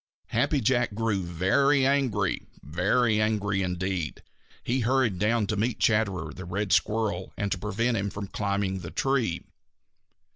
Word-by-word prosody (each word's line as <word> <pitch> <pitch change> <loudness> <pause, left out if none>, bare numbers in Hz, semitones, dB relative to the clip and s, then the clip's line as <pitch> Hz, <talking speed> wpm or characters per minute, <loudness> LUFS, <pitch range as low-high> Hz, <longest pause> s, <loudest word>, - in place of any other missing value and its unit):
Happy 145 - +1
Jack 120 -2 +1
grew 110 -3 0
very 95 - +2
angry, 125 -9 +1 0.2
very 105 - +2
angry 100 -2 0
indeed. 90 -2 -2 0.4
He 125 +2 0
hurried 120 -5 +1
down 110 +2 +2
to 105 - -2
meet 110 +3 0
Chatterer 95 -8 +1
the 95 - -8
Red 95 +3 -1
Squirrel 105 -4 0
and 100 -1 -2
to 95 - -1
prevent 115 +4 0
him 100 0 -1
climbing 100 -1 -2
the 85 -3 -7
tree. 125 -10 0
105 Hz, 140 wpm, -27 LUFS, 95-115 Hz, 0.4 s, very